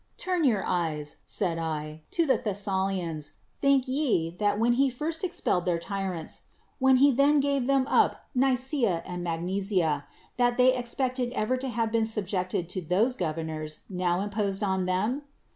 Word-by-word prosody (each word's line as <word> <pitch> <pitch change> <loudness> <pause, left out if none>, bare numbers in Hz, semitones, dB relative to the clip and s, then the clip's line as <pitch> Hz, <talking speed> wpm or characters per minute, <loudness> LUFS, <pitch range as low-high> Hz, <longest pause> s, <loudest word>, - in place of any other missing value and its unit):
— - - -41
"Turn 365 -3 -1
your 220 -7 +2
eyes," 155 -4 -2
said 170 -4 -1
I, 155 -1 -4
"to 335 - +1
the 270 - +3
Thessalians! 190 - -2 0.3
think 275 -2 +3
ye, 255 - +1
that 205 0 +1
when 235 +2 +3
he 270 +2 +3
first 310 +7 -3
ex 360 -1 -3
pelled 180 0 +1
their 175 -2 +1
tyrants, 185 -2 -4 0.4
when 265 0 +5
he 280 +2 +6
then 280 +3 +4
gave 275 -2 +1
them 275 -1 +3
up - - +2
l]6 250 - +4
L 270 - +4
Nicfca 250 - 0
and 180 0 -5
Magnesia, 175 -3 -1 0.3
that 245 -1 +2
they 255 0 +6
expected 250 0 -1
ever 215 +4 0
to 260 +1 -4
have 230 -1 -1
been 225 -1 +2
subjected 185 -5 -1
to 185 - -3
those 200 +10 +1
governors 155 -3 -4
now 180 0 0
imposed 200 0 -1
on 190 -2 0
them 210 +10 0
205 Hz, 175 wpm, -28 LUFS, 175-255 Hz, 0.4 s, he